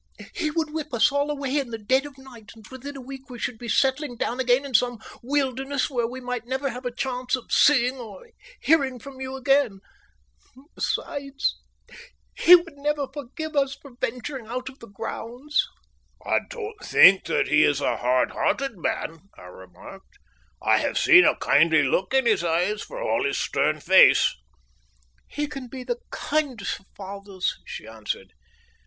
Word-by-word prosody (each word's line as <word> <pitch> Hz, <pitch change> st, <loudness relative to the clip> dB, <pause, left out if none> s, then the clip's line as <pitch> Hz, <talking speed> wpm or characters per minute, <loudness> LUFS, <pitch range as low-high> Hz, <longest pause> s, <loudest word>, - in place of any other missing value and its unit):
He 310 Hz, -3 st, -1 dB
would 315 Hz, -1 st, -2 dB
whip 305 Hz, -4 st, -4 dB
us 255 Hz, +6 st, +4 dB
all 285 Hz, +1 st, 0 dB
away 285 Hz, -1 st, -1 dB
in 270 Hz, -4 st, -4 dB
the 225 Hz, -, -5 dB
dead 260 Hz, +6 st, +1 dB
of 285 Hz, -, -14 dB
the 265 Hz, -, -16 dB
night, 235 Hz, -4 st, -14 dB
and 220 Hz, -2 st, -15 dB
within 275 Hz, +2 st, -8 dB
a -, -, -8 dB
week 265 Hz, +1 st, -10 dB
we 245 Hz, -, -8 dB
should 235 Hz, -1 st, -4 dB
be 235 Hz, -, -7 dB
settling 265 Hz, +2 st, +1 dB
down 240 Hz, +2 st, -2 dB
again 255 Hz, +2 st, +2 dB
in 275 Hz, -, -8 dB
some 245 Hz, 0 st, +2 dB, 0.2 s
wilderness 270 Hz, +1 st, -1 dB
where 240 Hz, -3 st, 0 dB
we 255 Hz, +2 st, -7 dB
might 250 Hz, -2 st, -5 dB
never 265 Hz, +1 st, -2 dB
have 250 Hz, +1 st, -6 dB
a -, -, -3 dB
chance 250 Hz, +1 st, -2 dB
of 255 Hz, -, -11 dB
seeing 260 Hz, -2 st, +4 dB
or 215 Hz, -6 st, -10 dB, 0.3 s
hearing 275 Hz, -5 st, +2 dB
from 265 Hz, +2 st, -11 dB
you 260 Hz, 0 st, -5 dB
again. 265 Hz, -6 st, +2 dB, 0.9 s
Besides, 280 Hz, 0 st, -2 dB, 0.8 s
he 360 Hz, -, +8 dB, 0.2 s
never 295 Hz, 0 st, -1 dB
would 265 Hz, -, -8 dB
forgive 300 Hz, +3 st, -7 dB
us 275 Hz, -1 st, +1 dB
for 280 Hz, -, -15 dB
venturing 245 Hz, 0 st, -4 dB
out 255 Hz, +3 st, -4 dB
of 265 Hz, -, -16 dB
the 230 Hz, -, -12 dB
grounds." 240 Hz, +7 st, -3 dB, 0.6 s
"I -, -, +2 dB
don't 435 Hz, -2 st, -7 dB
think 190 Hz, 0 st, +6 dB
that -, -, 0 dB
he 150 Hz, 0 st, +5 dB
is 145 Hz, -1 st, +2 dB
a -, -, 0 dB
hard 125 Hz, +1 st, +1 dB
hearted 270 Hz, -8 st, -1 dB
man," 165 Hz, 0 st, -3 dB, 0.2 s
I -, -, -13 dB
remarked. 90 Hz, 0 st, -14 dB, 0.5 s
"I -, -, +4 dB
have -, -, -1 dB
seen -, -, +7 dB
a -, -, +4 dB
kindly 155 Hz, 0 st, +4 dB
look 180 Hz, +7 st, 0 dB
in 265 Hz, -1 st, +3 dB
his 215 Hz, -6 st, +2 dB
eyes, 175 Hz, +5 st, 0 dB
for -, -, -8 dB
all -, -, 0 dB
his 405 Hz, 0 st, -1 dB
stern 150 Hz, +2 st, 0 dB
face." 190 Hz, +4 st, +6 dB, 0.9 s
"He 295 Hz, -, -3 dB
can 275 Hz, -3 st, -7 dB
be 255 Hz, +1 st, -8 dB
the 480 Hz, -, -3 dB
kindest 285 Hz, -8 st, -2 dB
of 195 Hz, -, -26 dB
fathers," 195 Hz, -1 st, -4 dB
she -, -, -8 dB
answered. 105 Hz, -3 st, -6 dB
255 Hz, 180 wpm, -24 LUFS, 220-280 Hz, 0.9 s, he